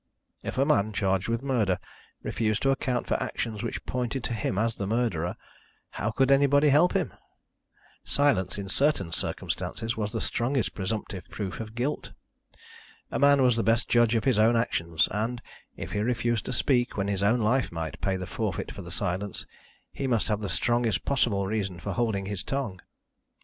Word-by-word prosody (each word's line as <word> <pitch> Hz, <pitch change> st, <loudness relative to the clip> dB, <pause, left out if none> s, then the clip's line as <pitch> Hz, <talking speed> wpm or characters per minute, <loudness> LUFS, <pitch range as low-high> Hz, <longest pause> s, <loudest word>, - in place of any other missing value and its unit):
If -, -, -5 dB
a 135 Hz, -, +4 dB
man, 110 Hz, -8 st, +2 dB
charged 95 Hz, -1 st, +1 dB
with 115 Hz, +2 st, -1 dB
murder, 110 Hz, -9 st, +1 dB, 0.5 s
refused 110 Hz, -2 st, 0 dB
to 135 Hz, -, +4 dB
account 130 Hz, -2 st, 0 dB
for -, -, 0 dB
actions 110 Hz, -3 st, -3 dB
which 115 Hz, -, -4 dB
pointed 125 Hz, +1 st, -2 dB
to -, -, -2 dB
him 100 Hz, -3 st, -1 dB
as 115 Hz, +2 st, +1 dB
the 100 Hz, -, -2 dB
murderer, 100 Hz, -7 st, 0 dB, 0.6 s
how 110 Hz, -, -2 dB
could 135 Hz, +4 st, +2 dB
anybody 140 Hz, +1 st, +5 dB
help 150 Hz, +6 st, +5 dB
him? -, -, 0 dB, 0.9 s
Silence, 120 Hz, -12 st, +2 dB
in 100 Hz, -1 st, -4 dB
certain 100 Hz, -, +1 dB
circumstances, 115 Hz, +6 st, -2 dB
was 105 Hz, -2 st, -2 dB
the -, -, -2 dB
strongest 125 Hz, 0 st, 0 dB
presumptive 95 Hz, -1 st, -4 dB
proof 95 Hz, -4 st, -5 dB
of 110 Hz, 0 st, -7 dB
guilt. 130 Hz, +5 st, -2 dB, 1.0 s
A -, -, -1 dB
man 140 Hz, -1 st, +6 dB
was 125 Hz, -2 st, +4 dB
the 115 Hz, -, +1 dB
best 115 Hz, +1 st, +2 dB
judge 120 Hz, -1 st, +4 dB
of 115 Hz, -, +1 dB
his 130 Hz, -6 st, +3 dB
own 115 Hz, +2 st, +5 dB
actions 85 Hz, -8 st, +1 dB
and, 115 Hz, +4 st, -1 dB, 0.4 s
if -, -, -6 dB
he 105 Hz, -, -1 dB
refused 120 Hz, 0 st, 0 dB
to -, -, -3 dB
speak 125 Hz, -5 st, +1 dB
when 100 Hz, 0 st, 0 dB
his 100 Hz, -1 st, -1 dB
own 110 Hz, +5 st, +3 dB
life 120 Hz, +4 st, +2 dB
might 80 Hz, -3 st, -5 dB
pay 95 Hz, -1 st, +1 dB
the 90 Hz, -, -4 dB
forfeit -, -, -3 dB
for 90 Hz, -3 st, -8 dB
silence, 95 Hz, +2 st, -3 dB, 0.5 s
he 135 Hz, -, -3 dB
must 115 Hz, -4 st, +1 dB
have 105 Hz, 0 st, 0 dB
the 100 Hz, -, -3 dB
strongest 120 Hz, +4 st, +1 dB
possible 115 Hz, -8 st, +2 dB
reason 100 Hz, -3 st, -2 dB
for -, -, -4 dB
holding 110 Hz, -5 st, 0 dB
his 100 Hz, -1 st, -4 dB
tongue. 120 Hz, -10 st, -3 dB
110 Hz, 180 wpm, -27 LUFS, 100-125 Hz, 1.0 s, man